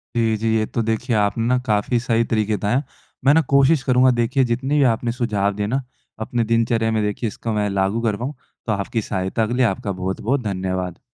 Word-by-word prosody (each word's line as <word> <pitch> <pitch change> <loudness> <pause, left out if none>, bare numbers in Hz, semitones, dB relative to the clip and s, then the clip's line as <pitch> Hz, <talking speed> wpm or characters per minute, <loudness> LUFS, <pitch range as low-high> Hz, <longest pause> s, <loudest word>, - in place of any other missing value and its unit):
जी, 115 -2 +2
जी। 110 +1 0
ये 110 - +1
तो 115 - -2
देखिए, 115 +2 -1
आपने 105 +2 +1
ना 125 0 +3
काफ़ी 110 +2 +1
सही 115 -1 +1
तरीके 110 -1 0
बताए 105 +4 0
हैं। 135 - +1 0.4
मैं 140 - +6
ना 160 - +5
कोशिश 140 +1 +4
करूँगा, 130 0 +4
देखिए, 120 +3 +1
जितने 130 +4 0
भी 145 - +4
आपने 115 +1 -2
सुझाव 105 -5 0
दिए 105 - -2
हैं - - -3
ना, 135 +3 0 0.4
अपने 115 +2 -1
दिनचर्या 115 0 +1
में 110 -1 +1
देखिए, 105 +3 -2
इसको 115 +2 -5
मैं 105 -1 0
लागू 100 +3 0
कर 110 -3 0
पाऊँ। 130 +6 -4 0.3
तो 110 - -1
आपकी 105 +3 -1
सहायता 95 +3 -1
के 120 - -3
लिए 125 0 +3
आपका 100 -1 -1
बहुत-बहुत 95 +8 -2
धन्यवाद। 95 -3 -3
115 Hz, 220 wpm, -21 LUFS, 105-125 Hz, 0.4 s, मैं